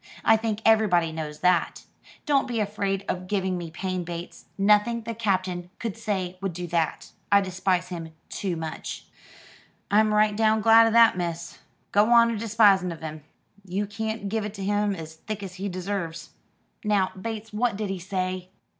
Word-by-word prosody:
I 225 - +7
think 220 -1 -2
everybody 200 -7 +4
knows 155 -1 -6
that. 180 -2 +2 0.4
Don't 280 -3 +2
be 240 -3 -2
afraid 200 -2 -1
of 185 0 -3
giving 190 -2 0
me 175 -2 -5
pain, 185 +2 -3
Bates. 170 0 -7
Nothing 210 +3 +3
the 230 - -4
Captain 185 -5 -1
could 225 -4 -4
say 190 -5 -3
would 195 -2 -2
do 180 +1 -5
that. 165 -2 -1 0.2
I 200 - +7
despise 185 -1 -1
him 165 -3 -6 0.2
too 190 -4 -3
much." 160 -1 -6 0.9
"I'm 215 +1 +4
right 210 0 +3
down 220 0 +3
glad 225 +1 +7
'o - - +3
that, 230 -3 +6
miss. 170 -1 -4 0.3
Go 205 +2 +4
on 235 -1 +6
a - - -2
despising 205 -4 +4
of 165 - -8
him. 155 -1 -7 0.4
You 195 +2 -2
can't 220 0 -4
give 220 +2 -1
it 210 0 -6
him 205 +1 0
as 160 -2 -9
thick 210 +3 -6
as 190 -2 -7
he 200 - -2
deserves." 180 -3 -4 0.5
"Now, 205 -3 +2
Bates, 220 +2 -6
what 225 0 +1
did 205 -1 -3
he 190 - -4
say?" 185 0 -3
195 Hz, 175 wpm, -26 LUFS, 180-215 Hz, 0.9 s, I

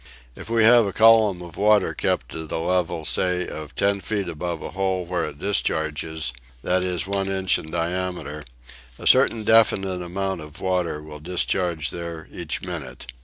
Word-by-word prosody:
If - - -10
we 115 -1 +3
have 115 -1 +6
a 100 - -4
column 110 -5 +5
of 85 -1 -11
water 105 -1 +3
kept - - -1
at 80 -1 -7
a - - -1
level 85 -1 -1
say 90 +1 +1
of 75 -1 -8
ten 100 0 +1
feet 100 -3 -2
above 85 0 -4
a - - -6
hole 95 -1 -1
where 85 -1 -1
it 70 - -7
discharges, 80 -6 -1 0.3
that 90 +1 +1
is 90 -1 -1
one 100 0 -1
inch 95 -1 +1
in 80 - -9
diameter, 85 -2 -3 0.5
a - - -10
certain 115 -2 +5
definite 95 -4 +3
amount 95 +2 -3
of 75 0 -11
water 90 -5 -1
will 75 -1 -10
discharge 85 -1 -1
there 85 -2 -6
each 85 -3 -4
minute. 65 -8 -7
90 Hz, 170 wpm, -23 LUFS, 80-95 Hz, 0.5 s, have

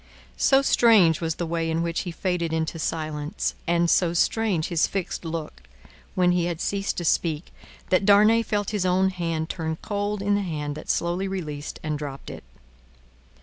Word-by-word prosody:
So 270 0 +4
strange 210 - +5
was 165 -1 -1
the 175 - -3
way 165 0 -1
in 165 +1 0
which 170 0 -1
he 175 - -4
faded 175 -1 -2
into 160 0 -2
silence, 155 +2 -2
and 170 0 +2
so 170 0 +3
strange 190 -2 +1
his 170 -3 +2
fixed 195 -2 -4
look 165 -2 -5 0.5
when 180 -1 +3
he 175 -1 +1
had 170 -2 -3
ceased 200 +1 -2
to 175 - -3
speak, 160 0 0 0.4
that 185 +1 +3
Darnay 210 +3 +6
felt 205 -3 -2
his 205 -3 -1
own 185 +1 +2
hand 165 -3 -2
turn 160 -2 -3
cold 205 -1 -2
in 205 0 +2
the 205 - +2
hand 150 -6 -3
that 155 - -10
slowly 175 +3 0
released 155 -7 -5
and 155 -2 -2
dropped 140 -2 -7
it. - - -9
170 Hz, 180 wpm, -25 LUFS, 160-195 Hz, 0.5 s, Darnay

